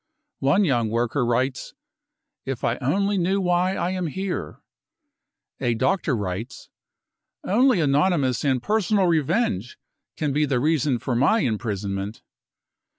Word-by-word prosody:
One 145 +10 +3
young 120 -8 +1
worker 120 +4 0
writes: 125 - -1 0.3
" - - -59 0.3
If 135 -3 -4
I 115 - 0
only 195 +9 0
knew 190 +3 +1
why 180 0 +1
I 180 - -1
am 185 -2 -2
here." 190 +4 -4 1.0
A 120 -3 0
doctor 160 +3 +1
writes: 100 +4 -5 0.7
<c - - -4
Only 245 0 +4
anonymous 145 - +2
and 130 -4 +1
personal 210 -2 +2
revenge 160 - 0 0.4
can 150 -3 -1
be 150 +2 +2
the 135 -3 0
reason 145 -2 +1
for 125 +2 -3
my 210 - +3
imprisonment. 105 - -3
140 Hz, 135 wpm, -24 LUFS, 120-185 Hz, 1.0 s, Only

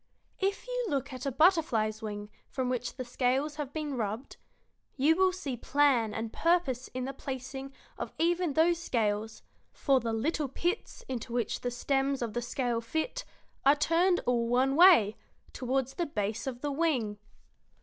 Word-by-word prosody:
If 395 +1 -1
you - - -2
look 275 -4 -2
at 255 +2 -5
a - - 0
butterfly's 250 - +3
wing 210 -1 -6 0.2
from 255 -1 -2
which 245 -1 -2
the 255 - -5
scales 265 +5 0
have 290 -3 -4
been 300 -3 -3
rubbed 220 +2 -4 0.6
you 290 +4 +4
will 375 +1 +4
see 305 -8 -4
plan 255 -3 +2
and 225 +1 -4
purpose 330 -8 +1
in 255 0 -2
the 270 - -4
placing 270 0 -6 0.3
of - - -4
even 345 -1 +1
those 335 +3 +3
scales; 220 -4 -1 0.3
for 275 -2 +2
the 230 -2 -2
little 285 +6 0
pits 350 - -3
into 250 -2 -5
which 240 -1 -1
the 245 - -1
stems 270 +2 0
of 225 -3 -4
the 240 - -1
scale 240 -1 -1
fit 315 - -3 0.4
are 280 +2 +6
turned 340 +4 +2
all 235 -1 +1
one 260 +3 +3
way, 325 - +7 0.4
toward 260 +1 0
the 340 +5 -3
base 215 -1 -2
of 250 -2 -4
the 290 - -1
wing." 270 -9 0
265 Hz, 170 wpm, -30 LUFS, 235-315 Hz, 0.6 s, way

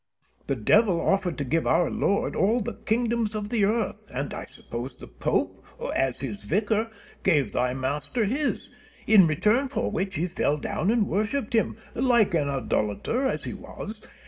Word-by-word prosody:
Penn. 135 - 0
The 110 - -11
devil 205 - +4
offered 185 -1 +1
to 145 - -1
give 160 +5 0
our 165 +1 +3
Lord 200 - 0
all 220 +5 +3
the - - -3
kingdoms 230 -1 0
of 210 -1 -3
the 215 -4 +2
earth, 215 -1 0
and - - -3
I - - -5
suppose 120 +3 -7
the - - -11
Pope, - - -2 0.3
as 135 -2 0
his 115 -7 -4
vicar, 210 - 0 0.3
gave 145 - +2
thy 125 +1 0
master 145 - -1
this; 280 +8 -1 0.4
in 200 -5 +7
return 210 - +2
for 270 - -2
which 190 0 -2
he 165 - 0
fell 165 -4 0
down 180 +5 -1
and 225 -3 +3
worshipped 215 +4 -1
him, 225 - +1 0.2
like 235 -6 +3
an 150 -4 +1
idolater 135 - 0
as - - -2
he - - -4
was. 215 0 -8
200 Hz, 175 wpm, -26 LUFS, 145-225 Hz, 0.4 s, in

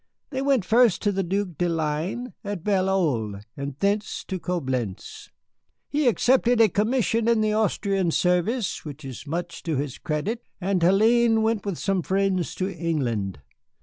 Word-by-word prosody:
They 265 -1 -2
went 270 -7 +2
first 230 -3 +4
to 205 - +2
the 195 0 -1
Duke 185 -3 -2
de 175 - +2
Ligne, 165 +9 -2
at 200 -5 -4
Bel 190 -2 +1
Oeil, 120 - 0 0.2
and 140 -1 -5
thence 200 +4 -1
to 190 - -4
Coblentz. 130 - -4 0.6
He 290 -2 +1
accepted 245 0 +3
a 225 -2 +6
commission 230 +3 +1
in 230 -2 +3
the 215 0 +1
Austrian 200 -4 +1
service, 180 +6 0
which 150 -1 -9
is 135 +3 -8
much 170 +3 -4
to 160 -3 -2
his 140 -1 -3
credit, 185 +10 -2 0.2
and 190 -1 0
Hélène 220 +5 +4
went 220 -2 0
with 190 -5 -2
some 195 -2 0
friends 190 -1 0
to 190 +1 -2
England. 120 - -2
190 Hz, 160 wpm, -25 LUFS, 160-220 Hz, 0.6 s, a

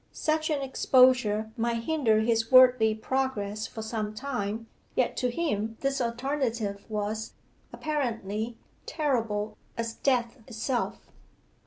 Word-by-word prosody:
Such 310 0 0
an 290 -3 0
exposure 250 -5 +3
might 230 0 -1
hinder 230 -8 +2
his 225 0 +1
worldly 250 -4 +7
progress 220 -3 -2
for 220 - -7
some 215 -1 -3
time. 225 -4 -3 0.3
Yet - - +1
to 250 - +1
him 225 -6 -2
this 275 -1 0
alternative 235 -4 -2
was, 215 +1 -3 0.4
apparently, 230 -6 -2 0.3
terrible 225 -8 -1 0.2
as 230 0 -2
death 250 -1 0
itself. 245 +1 -3
230 Hz, 115 wpm, -28 LUFS, 220-265 Hz, 0.4 s, worldly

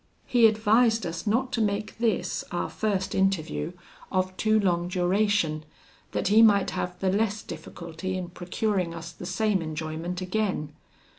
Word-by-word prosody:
He 240 -2 +6
advised 220 +1 +3
us 170 +3 -5
not 250 +5 +1
to 235 - 0
make 210 +1 -1
this, 225 -5 0
our 175 - -2
first 195 -3 -1
interview, 170 - 0 0.4
of 185 0 0
too 215 +2 +3
long 175 -3 +1
duration, 180 -3 +1 0.5
that - - 0
he 215 +2 +6
might 205 -3 +5
have 180 0 -3
the 190 -1 +2
less 210 +1 0
difficulty 170 +2 -6
in 180 -2 -5
procuring 180 0 -2
us 165 0 -7
the 180 - -8
same 195 0 +1
enjoyment 160 +2 -4
again. 185 -5 -2
190 Hz, 150 wpm, -27 LUFS, 175-215 Hz, 0.5 s, He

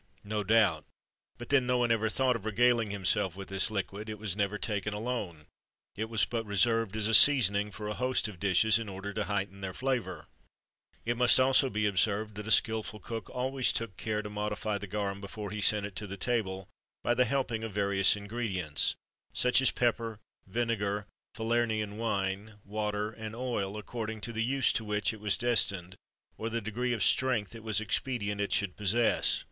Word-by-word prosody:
No 105 0 -2
doubt, 100 -6 +3 0.5
but 120 - -9
then 135 -3 +3
no 125 0 +2
one 120 -1 +2
ever 110 -1 +2
thought 130 +2 +2
of 115 - -5
regaling 115 +1 +2
himself 100 -1 0
with 95 -1 -8
this 95 +3 +2
liquid; 100 +1 -4
it 110 - -5
was 105 -3 -2
never 105 0 0
taken 105 -1 -2
alone; 105 -9 -4 0.5
it 110 +2 -3
was 110 -2 +2
but 115 -1 -3
reserved 115 0 +1
as 110 -1 +1
a 115 - 0
seasoning 105 -6 +6
for 105 0 -7
a 105 - -2
host 125 0 0
of 100 -5 -10
dishes, 100 +4 +4
in 110 -3 -5
order 100 +1 -6
to 105 - -2
heighten 100 -1 -3
their 95 -1 -5
flavour. 130 -3 -2 0.8
It 120 +1 0
must 125 +1 +6
also 130 +1 +5
be 105 -2 -1
observed, 105 +2 +1
that 105 +1 -7
a - - -4
skilful 110 +1 +2
cook 115 0 -6
always 130 +1 0
took 115 -5 -3
care 105 -1 -2
to 105 - -6
modify 105 0 -2
the 105 - -7
garum 100 -1 -3
before 105 +1 -6
he 105 -1 -4
sent 105 0 +4
it 100 -2 -8
to 100 -1 -5
table, 95 -5 -1 0.4
by 120 - +2
the 125 +1 +3
help 130 +1 -1
of 115 -1 -3
various 100 -1 +3
ingredients, 100 -7 -2 0.4
such 125 +1 +3
as 135 - +5
pepper, 115 -2 0 0.3
vinegar, 105 -2 -1 0.3
Falernian 110 -2 0
wine,[XXIII 100 -2 -1
36] - - -23
water, 105 +1 -2
and 110 0 -7
oil,[XXIII 115 -6 -2
37] - - -4
according 110 -1 -5
to 115 - -3
the 110 0 -1
use 130 +2 +2
to 110 - -1
which 105 -4 0
it 110 - -10
was 105 -2 +1
destined, 100 -7 0 0.4
or 115 - -2
the 115 +1 -1
degree 115 +3 -2
of 115 - -1
strength 125 -6 +2
it 115 -1 -10
was 110 -2 0
expedient 105 -2 -1
it 100 - -2
should 100 -3 0
possess. 110 +3 +2
105 Hz, 195 wpm, -30 LUFS, 100-115 Hz, 0.8 s, seasoning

